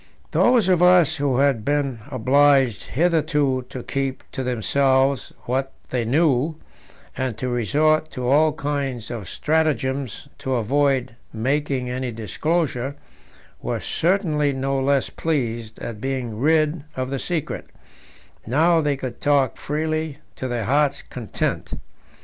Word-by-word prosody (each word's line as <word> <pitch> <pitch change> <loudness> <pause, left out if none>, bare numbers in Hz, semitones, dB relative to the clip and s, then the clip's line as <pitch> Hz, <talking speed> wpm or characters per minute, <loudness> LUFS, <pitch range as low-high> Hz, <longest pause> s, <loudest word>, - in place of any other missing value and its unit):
Those 240 -5 +4
of 180 -2 +3
us 180 -3 +5
who 140 -3 +1
had 135 -5 +2
been 140 -2 0
obliged 135 -2 +3
hitherto 150 -5 +1
to 125 - -7
keep 135 -1 -3
to - - -4
themselves 130 +2 +1
what 135 +2 -2 0.2
they 125 -2 0
knew, 145 +3 +2 0.6
and 130 -4 -2
to 130 - -3
resort 150 +7 +2
to 125 -4 -4
all 150 +4 +4
kinds 140 -6 -3
of 110 -6 -6
stratagems 140 -5 -1
to 130 -1 -1
avoid 130 +1 +1 0.2
making 130 +2 -1
any 130 0 -3
disclosure, 135 - -1 0.7
were - - -2
certainly 160 -5 +1
no 135 +1 -1
less 135 0 +1
pleased 120 -8 -2
at 105 -3 -7
being 125 -4 -3
rid 155 +2 +2
of 130 0 -3
the 135 - -2
secret; 170 -1 -3 0.8
now 160 +7 +4
they 145 -2 0
could 130 -3 -6
talk 140 -2 +2
freely 155 0 -2 0.2
to 130 - -4
their 120 -3 -2
heart's 140 +1 +1
content. 120 -4 -3
135 Hz, 130 wpm, -22 LUFS, 125-150 Hz, 0.8 s, us